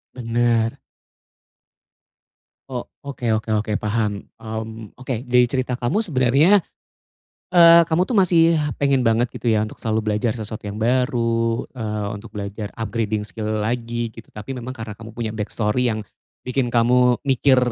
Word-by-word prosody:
Benar. 115 0 +1 1.9
Oh, 125 -2 -4 0.2
oke 140 -4 -5
oke 110 0 -3
oke 105 0 -2
paham. 105 -1 -1 0.2
Mmm, 110 -1 -7
oke 130 -1 -5
dari 125 0 +5
cerita 130 -2 -1
kamu 125 - 0
sebenarnya, 155 - +4 0.9
eee, 170 -1 +8
kamu 170 +3 +2
tuh 250 - -4
masih 170 -5 +5 0.2
pengen 140 -2 +2
banget 115 0 +3
gitu 120 - -2
ya, 110 -1 +2
untuk 110 - -11
selalu 110 -1 -1
belajar 105 +2 0
sesuatu 110 -1 -5
yang 100 - -6
baru, 115 -1 +1
eee, 105 -4 -3
untuk 100 - -9
belajar 100 +1 -5
upgrading 110 -1 -2
skill 110 0 -3
lagi 120 0 -2
gitu, 115 - -13
tapi 105 +5 -7
memang 125 -1 -6
karena 110 -4 -6
kamu 110 +2 -11
punya 110 -2 -2
backstory 110 +3 0
yang 110 -2 -3 0.4
bikin 125 -1 0
kamu 125 +1 +3
mikir 135 0 +3
115 Hz, 145 wpm, -21 LUFS, 110-130 Hz, 1.9 s, eee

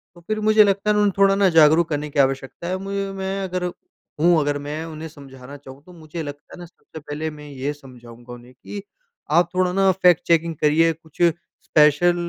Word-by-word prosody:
तो 175 - -16
फिर 215 0 -2
मुझे 215 0 +6
लगता 200 +1 0
है 210 - +3
ना, 210 - +2
उन्हें 205 -2 +2
थोड़ा 195 0 +4
ना 195 -1 +3
जागरूक 160 +2 +5
करने 150 -1 -3
की 145 - -3
आवश्यकता 135 +3 -1
है। 185 +1 -2
मुझे 195 0 -3
मैं 195 0 -4
अगर 180 -1 -3
हूँ, 170 -1 -1
अगर 145 -1 -1
मैं 155 +2 -4
उन्हें 160 0 -8
समझाना 140 -2 -13
चाहूँ, 135 0 -14
तो 180 - -16
मुझे 160 0 -8
लगता 145 -1 -10
है - - -14
ना, 175 - -8
सबसे 165 -1 -14
पहले 150 +1 -5
मैं 150 -1 -12
ये 140 +1 -4
समझाऊँगा 120 -3 -14
उन्हें 120 +1 -14
कि, 200 +10 -9 0.5
"आप 170 +2 +3
थोड़ा 185 -1 +1
ना, 195 0 +3
फैक्ट 180 -3 +3
चेकिंग 165 -1 +2
करिए, 160 +2 +3
कुछ 160 +1 -15 0.4
स्पेशल, 150 +3 +4
160 Hz, 210 wpm, -21 LUFS, 145-180 Hz, 0.5 s, मुझे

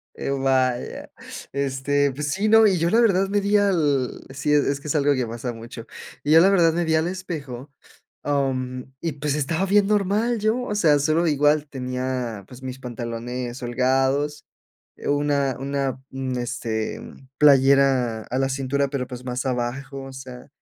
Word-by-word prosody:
Eh, - - -4
uh, 135 -1 -2
vaya, 130 -2 0 0.4
este, 140 +1 0
pues 145 +2 -3
sí, 205 +3 0
no, 225 0 +7
y 190 -4 +3
yo 170 +2 +1
la 230 - +4
verdad 195 -4 +3
me 205 0 +1
di 200 +1 +2
al 155 -10 +1
sí, 140 +2 -1
es 140 -1 +2
que 150 - -8
es 145 - 0
algo 145 0 +3
que 125 -2 -1
pasa 120 +2 -5
mucho, 115 0 -10 0.4
yo 155 +2 +6
la 190 - +6
verdad 170 -4 +4
me 170 +1 0
vi 160 0 +1
al 160 +1 +1
espejo, 150 -8 -6 0.5
am, 130 -2 -2
y 165 -2 -2
pues, 145 0 -2
estaba 160 +5 0
bien 200 +1 +4
normal 210 +3 +1
yo. 220 +4 +1
O 210 -4 -3
sea, 155 -8 +4
solo 155 +4 +1
igual, 150 0 +2
tenía, 125 -5 -4
pues, 130 +1 -13
mis 130 0 -6
pantalones 120 0 -5
holgados, 135 +4 0 0.5
eh, - - -6
una 145 -2 +1
una 135 -1 -2
un 130 -1 -4
este, 115 -3 -3 0.4
playera 135 -5 +4
a 130 - -3
la 135 0 +1
cintura, 135 +1 -1
pero, 135 -3 -3
pues, 125 0 -9
más 125 +1 -3
abajo, 130 +2 -3
o 135 - -9
sea, 130 0 -10
140 Hz, 175 wpm, -23 LUFS, 130-155 Hz, 0.5 s, no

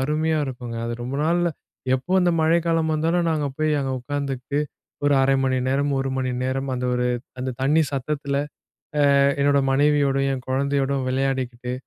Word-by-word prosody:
அருமையா 155 +3 +1
இருக்குங்க. 125 -3 -6
அது 115 - -3
ரொம்ப 130 +3 -4
நாள்ல 175 +1 +2 0.5
எப்போ 130 +8 -3
அந்த 180 - +3
மழைக்காலம் 165 0 +2
வந்தாலும், 165 +3 +1
நாங்க 150 -2 0
போய் 155 -1 +1
அங்கே 135 -1 -2
உட்காந்துகிட்டு 140 0 -3 0.5
ஒரு 145 0 +4
1/2 135 +1 +3
மணி 130 -1 +1
நேரம், 140 +2 +1
1 135 - -2
மணி 130 -1 -1
நேரம் 135 +1 -2
அந்த 125 - -3
ஒரு 125 0 0 0.3
அந்த 130 +1 -2
தண்ணி 150 +4 +4
சத்தத்தில 140 +1 -2 0.6
அ - - +5 0.4
என்னோட 140 0 +4
மனைவியோடையும், 135 -1 +2
என் 130 0 -8
குழந்தையோடும் 140 0 0
விளையாடிக்கிட்டு 130 -2 -2
140 Hz, 155 wpm, -23 LUFS, 130-150 Hz, 0.6 s, அ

